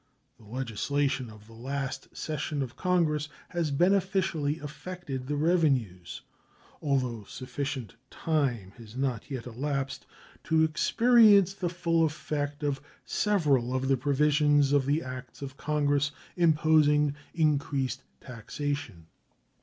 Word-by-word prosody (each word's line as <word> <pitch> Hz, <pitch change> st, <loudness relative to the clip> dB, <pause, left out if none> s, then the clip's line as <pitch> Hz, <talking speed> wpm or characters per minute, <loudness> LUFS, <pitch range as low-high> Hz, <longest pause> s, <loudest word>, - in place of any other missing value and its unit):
The 110 Hz, -, -17 dB
legislation 130 Hz, +3 st, -1 dB
of 105 Hz, -1 st, -14 dB
the 115 Hz, -, -16 dB
last 135 Hz, +3 st, -5 dB
session 150 Hz, -2 st, -2 dB
of 125 Hz, -2 st, -8 dB
Congress 160 Hz, -5 st, +1 dB, 0.2 s
has 170 Hz, -3 st, -1 dB
beneficially 175 Hz, -2 st, +1 dB
affected 150 Hz, -3 st, -7 dB
the 145 Hz, -, -1 dB
revenues, 140 Hz, -, +1 dB, 0.6 s
although 130 Hz, -7 st, 0 dB
sufficient 130 Hz, -1 st, -5 dB
time 130 Hz, -, -1 dB
has 115 Hz, -1 st, -12 dB
not 130 Hz, -5 st, -2 dB
yet 130 Hz, -5 st, -5 dB
elapsed 135 Hz, +2 st, -3 dB, 0.4 s
to 160 Hz, 0 st, +3 dB
experience 205 Hz, +4 st, +5 dB
the 180 Hz, -3 st, -2 dB
full 170 Hz, -1 st, +1 dB
effect 145 Hz, -1 st, -2 dB
of 140 Hz, -2 st, -1 dB, 0.2 s
several 145 Hz, -, +1 dB
of 130 Hz, 0 st, -1 dB
the 135 Hz, -, +5 dB
provisions 145 Hz, +1 st, +3 dB
of 140 Hz, -2 st, +3 dB
the 150 Hz, +3 st, +1 dB
acts 130 Hz, 0 st, -8 dB
of 135 Hz, -1 st, -7 dB
Congress 145 Hz, -1 st, +1 dB, 0.3 s
imposing 150 Hz, -3 st, +4 dB, 0.2 s
increased 140 Hz, -4 st, 0 dB, 0.2 s
taxation. 130 Hz, -, -5 dB
145 Hz, 115 wpm, -28 LUFS, 130-155 Hz, 0.6 s, experience